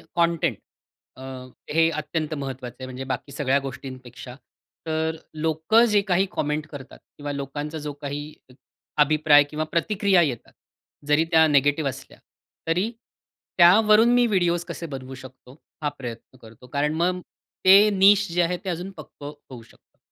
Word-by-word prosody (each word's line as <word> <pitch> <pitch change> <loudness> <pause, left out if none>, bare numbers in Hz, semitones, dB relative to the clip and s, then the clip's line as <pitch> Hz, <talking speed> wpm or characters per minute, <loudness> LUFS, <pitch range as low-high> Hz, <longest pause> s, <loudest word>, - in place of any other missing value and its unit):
Content 170 -1 +1 0.6
अ, 130 - -10 0.5
हे 165 0 +4
अत्यंत 155 0 -3
महत्त्वाचं 130 -4 -6
आहे, 130 - -6
म्हणजे 130 0 -7
बाकी 135 +1 -5
सगळ्या 140 0 +1
गोष्टींपेक्षा. 130 -2 -9 0.5
तर 160 0 -1 0.2
लोकं 160 +9 +2
जे 210 -3 +3
काही 190 -1 +1
कॉमेंट 150 -3 -2
करतात 140 -3 -11 0.2
किंवा 145 0 -5
लोकांचा 145 +3 -5
जो 150 -1 -5
काही 145 0 -5 0.3
एक 125 - -18 0.5
अभिप्राय 150 0 +5
किंवा 155 0 -3
प्रतिक्रिया 195 +1 +2
येतात, 130 -8 -3 0.5
जरी 150 +2 +3
त्या 160 -1 +6
निगेटिव्ह 145 0 +2
असल्या, 135 +1 -11 0.5
तरी 180 +7 +1 0.7
त्यावरून 215 +6 +6
मी 245 0 +4
व्हिडिओज 175 -5 +1
कसे 170 - -6
बनवू 130 0 -8
शकतो, 130 -1 -14 0.3
हा 145 - +1
प्रयत्न 120 +1 -9
करतो. 115 +2 -15
कारण 145 +3 -1
मग 180 +2 0 0.4
ते 200 +3 +8
निश 200 +1 +5
जे 175 - +1
आहे, 180 +1 -1
ते 190 - -7
अजून 180 +3 -4
पक्कं 145 -1 -10 0.2
होऊ 125 -3 -10
शकतं. - - -25
155 Hz, 150 wpm, -24 LUFS, 135-175 Hz, 0.7 s, ते